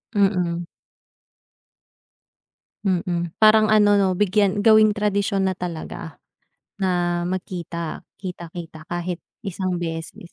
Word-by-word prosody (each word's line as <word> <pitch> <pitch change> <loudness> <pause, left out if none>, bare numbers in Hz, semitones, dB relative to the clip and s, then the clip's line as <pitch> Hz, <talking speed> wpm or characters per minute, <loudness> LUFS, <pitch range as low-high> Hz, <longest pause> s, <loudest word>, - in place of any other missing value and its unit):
Mm. 180 -4 +1 2.2
Mm. 175 -3 -1
Parang 215 0 +6
ano, 205 -1 +5
'no, 195 -2 +3
bigyan 205 +1 +2
gawing 215 0 +6
tradisyon 205 -1 0
na 190 - -1
talaga. 170 -2 -6 0.6
Na 175 -2 +1
magkita, 170 -3 -4 0.2
kita-kita 170 -3 -8
kahit 175 0 -3 0.2
isang 185 -2 -2
beses. 165 0 -6
185 Hz, 95 wpm, -23 LUFS, 175-205 Hz, 2.2 s, Parang